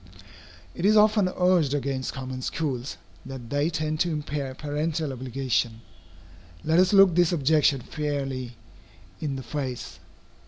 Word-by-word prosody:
It 170 - -6
is 215 +2 +5
often 210 -2 +5
urged 180 -6 +2
against 135 -2 -2
common 130 -1 -6
schools, 135 -3 -3 0.3
that 130 -3 -9
they 145 +2 +1
tend 155 -1 -2
to 175 - +2
impair 145 -3 -3
parental 150 +1 -2
obligation. 125 -3 -1 0.8
Let 160 +2 +3
us 185 0 +4
look 195 -3 +7
this 175 0 +3
objection 150 -3 +3
fairly 135 -4 -3 0.6
in 145 -3 -2
the 130 - -6
face. 130 -1 -5
145 Hz, 130 wpm, -26 LUFS, 130-165 Hz, 0.8 s, look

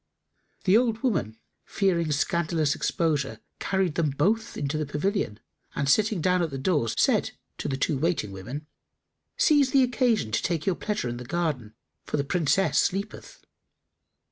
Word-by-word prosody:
The 195 -1 +4
old 230 0 +2
woman, 160 - 0 0.3
fearing 170 -5 0
scandalous 155 0 +1
exposure, 145 -8 -1 0.2
carried 190 -4 0
them 160 -2 +1
both 195 +11 0
into 145 +1 -2
the 155 - -1
pavilion, 150 - -1 0.4
and, 140 - -1
sitting 210 +4 +3
down 180 +2 +2
at 165 - 0
the 135 - -5
door, 145 -3 +1
said - - +2 0.3
to - - -3
the 135 - -2
two 135 0 0
waiting 160 - 0
women, 120 +11 -7 0.7
"Seize 295 - +4
the 270 0 +4
occasion 245 - +1
to 115 - +1
take 165 -3 -1
your 190 - +2
pleasure 210 -4 -3
in 120 0 -4
the 125 - -7
garden, 135 -7 -2 0.3
for - - -3
the 140 - +1
Princess 165 +2 +2
sleepeth." 200 +3 -3
165 Hz, 160 wpm, -26 LUFS, 140-200 Hz, 0.7 s, The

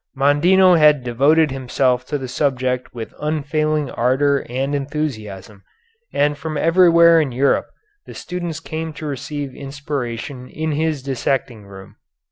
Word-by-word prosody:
Mondino 170 +6 +4
had 150 -3 +5
devoted 140 +6 +3
himself 130 -1 0
to 150 - -2
the 130 -2 -6
subject 125 -1 -1
with 115 -2 -8
unfailing 155 -1 -1
ardor 135 +3 +1
and 135 +3 -2
enthusiasm, 115 -9 -5 0.5
and 145 +1 +1
from 155 +1 -4
everywhere 170 0 +5
in 145 -4 -2
Europe 135 +3 +1 0.4
the - - -10
students 175 -3 -5
came 160 0 -5
to 155 - -8
receive 145 0 -5
inspiration 135 -2 -6
in 160 +1 -3
his 155 -2 -1
dissecting 130 -4 -2
room. 95 -1 -13
145 Hz, 130 wpm, -19 LUFS, 130-155 Hz, 0.5 s, had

